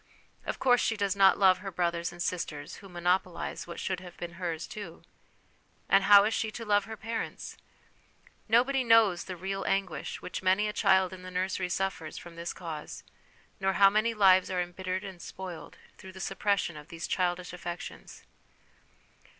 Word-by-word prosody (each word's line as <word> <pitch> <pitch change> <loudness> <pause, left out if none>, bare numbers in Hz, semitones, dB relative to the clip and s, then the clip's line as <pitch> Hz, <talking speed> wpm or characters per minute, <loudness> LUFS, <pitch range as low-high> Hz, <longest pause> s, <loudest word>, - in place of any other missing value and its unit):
Of - - -2
course 245 -2 +4
she 225 - 0
does 200 -2 0
not 195 -1 +6
love 185 -2 +5
her 195 +1 -5
brothers 170 -2 -1
and 175 0 -5
sisters, 150 -4 -4
who 195 - -13
monopolise 175 0 -1
what 170 - -7
should 190 -2 -2
have 180 -2 -12
been 170 0 -6
hers 165 -2 -2
too. 180 -6 -9 0.8
And 195 0 +4
how 200 0 +9
is 215 +2 +1
she 220 - -1
to 230 +2 -6
love 205 -1 +3
her 220 0 -8
parents? 225 +1 -5 0.9
Nobody 255 +3 +3
knows 225 -6 +4
the 185 - -6
real 195 +2 -3
anguish 185 -7 -2
which - - -6
many 190 +3 +3
a 210 - -3
child 190 -3 +3
in 185 - -9
the 185 - -8
nursery 185 0 -2
suffers 180 -4 -3
from 175 -1 -10
this 170 0 -4
cause, 160 -4 -7 0.6
nor 190 0 +1
how 195 0 +6
many 220 +2 +1
lives 190 -3 +5
are 185 - -1
embittered 185 +2 -3
and 190 -3 -9
spoiled 180 -4 -8 0.2
through 190 -2 -11
the 190 - -10
suppression 195 -2 0
of 150 0 -11
these 165 0 -6
childish 180 -1 -1
affections. 175 -1 -8
185 Hz, 175 wpm, -29 LUFS, 175-200 Hz, 0.9 s, how